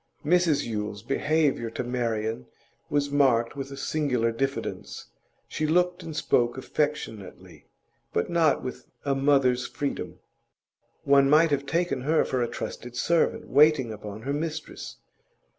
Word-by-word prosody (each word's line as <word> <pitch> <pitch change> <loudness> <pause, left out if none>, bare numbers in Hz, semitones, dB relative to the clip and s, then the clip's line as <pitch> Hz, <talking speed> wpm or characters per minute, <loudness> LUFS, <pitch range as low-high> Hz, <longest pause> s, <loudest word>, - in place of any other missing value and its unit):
Mrs 170 -2 +3
Yule's 105 -2 -4
behaviour 140 -1 +1
to 115 +2 -4
Marian 115 - -2 0.4
was 145 -1 0
marked 130 -5 +3
with 135 -1 -5
a 140 - -8
singular 135 -6 0
diffidence; 135 +4 -4 0.4
she 155 - -2
looked 175 +2 +2
and 160 - -7
spoke 120 -4 +1
affectionately, 140 -8 -4 0.4
but 85 - 0
not 165 -3 +2
with 125 -1 -7 0.2
a 140 - +2
mother's 135 -2 +2
freedom; 140 -1 -4 0.9
one 140 -1 +5
might 155 +2 +5
have 140 0 0
taken 170 -5 0
her 155 +4 +2
for 130 - -1
a 120 - +1
trusted 120 +1 -6
servant 165 +7 +1
waiting 145 -6 +4
upon 105 0 -8
her 140 +2 -2
mistress. 155 +1 -5
135 Hz, 135 wpm, -26 LUFS, 120-150 Hz, 0.9 s, one